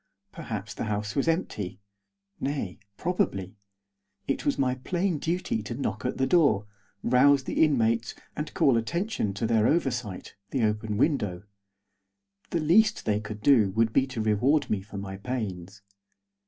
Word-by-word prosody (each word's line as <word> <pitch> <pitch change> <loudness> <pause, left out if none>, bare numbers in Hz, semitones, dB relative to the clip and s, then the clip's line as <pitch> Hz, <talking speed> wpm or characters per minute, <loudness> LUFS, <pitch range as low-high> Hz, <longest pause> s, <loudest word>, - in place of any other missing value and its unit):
Perhaps 110 - -6
the - - -4
house 105 0 -2
was 140 - +1
empty; 105 - -1 0.6
nay, 135 -10 -3 0.2
probably. 100 - -1 0.7
It 135 - -1
was 285 - +2
my 130 -2 +2
plain 170 +6 -1
duty 170 - -1
to 110 +3 -5
knock 135 0 -3
at 125 - -1
the 130 - +2
door, 140 - +3 0.4
rouse 135 +3 +5
the - - +2
inmates, 115 -6 +2 0.2
and 150 +1 -4
call 130 -4 +4
attention 170 - -1
to 115 - -1
their 110 -1 +3
oversight, 125 - -1 0.2
the 130 -4 0
open 105 0 0
window. 105 - 0 1.1
The 170 - 0
least 215 +8 +4
they 105 -1 +1
could 105 0 -7
do 120 -8 +5
would 115 +1 +2
be 135 0 +3
to 125 -4 -4
reward 120 +8 +2
me 105 -3 +1
for 105 +1 -10
my 95 -1 -5
pains. 100 -4 -5
115 Hz, 155 wpm, -27 LUFS, 105-145 Hz, 1.1 s, rouse